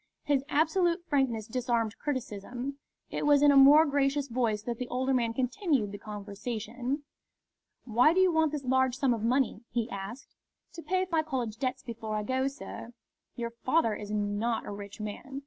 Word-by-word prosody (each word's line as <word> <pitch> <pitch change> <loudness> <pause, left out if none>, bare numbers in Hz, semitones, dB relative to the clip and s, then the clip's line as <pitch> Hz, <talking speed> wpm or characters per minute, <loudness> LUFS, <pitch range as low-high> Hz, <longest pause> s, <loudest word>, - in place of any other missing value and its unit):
His 280 -2 +1
absolute 335 +3 +2
frankness 260 -8 0
disarmed 235 -2 -1
criticism. 255 0 -4 0.3
It - - -2
was 290 -1 +5
in 290 - +7
a - - +4
more 285 +3 +8
gracious 280 -1 +1
voice 230 -4 0
that 235 -1 -4
the 250 - -3
older 260 +2 0
man 235 -3 +1
continued 260 - 0
the 205 - -7
conversation. 225 +6 -5 0.8
"Why 245 +5 +4
do 360 - +2
you 375 -1 +5
want 320 -2 +2
this 295 -3 -4
large 260 0 +2
sum 265 -3 +2
of 225 - -3
money?" 245 -2 +1
he 230 -1 -1
asked. 200 +7 -7 0.4
"To 335 - -8
pay 370 +2 0
my 325 -1 +3
college 255 -8 -3
debts 255 0 -2
before 225 -3 -5
I 210 - -1
go, 260 +4 0
sir." 275 -4 -8 0.4
"Your 235 -1 -4
father 235 0 +1
is 205 - -7
not 210 +2 -1
a - - -6
rich 200 0 -8
man." 235 +6 -6
255 Hz, 180 wpm, -29 LUFS, 225-285 Hz, 0.8 s, more